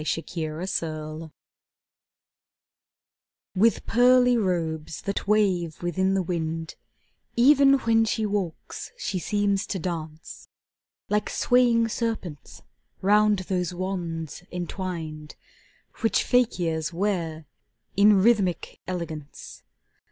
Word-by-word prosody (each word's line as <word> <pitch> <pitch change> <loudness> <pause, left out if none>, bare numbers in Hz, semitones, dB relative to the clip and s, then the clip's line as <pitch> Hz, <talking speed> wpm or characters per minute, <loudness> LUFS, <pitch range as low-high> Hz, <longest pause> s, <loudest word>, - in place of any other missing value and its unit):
Sonnet 165 +1 -3
XXVIII 160 -1 -4 2.3
With 220 +5 +3
pearly 250 +1 +5
robes 165 -7 -2
that 200 0 -3
wave 185 -7 +1
within 190 +2 +1
the 190 - +1
wind, 165 -1 -3 0.6
Even 275 +3 +6
when 225 0 +3
she 220 0 -1
walks, 200 -5 -4
she 195 - -3
seems 200 +1 0
to 195 - -2
dance, 160 -3 -6 0.6
Like 210 0 0
swaying 240 -2 +3
serpents 215 - -4 0.4
round 210 +1 +4
those 180 -1 -1
wands 175 -4 -4
entwined 170 -4 -5 0.6
Which 225 - +1
fakirs 170 -10 +1
ware 170 -4 -2 0.5
in 200 -1 +5
rhythmic 200 -6 +1
elegance. 160 -5 -6
185 Hz, 90 wpm, -25 LUFS, 165-210 Hz, 2.3 s, Even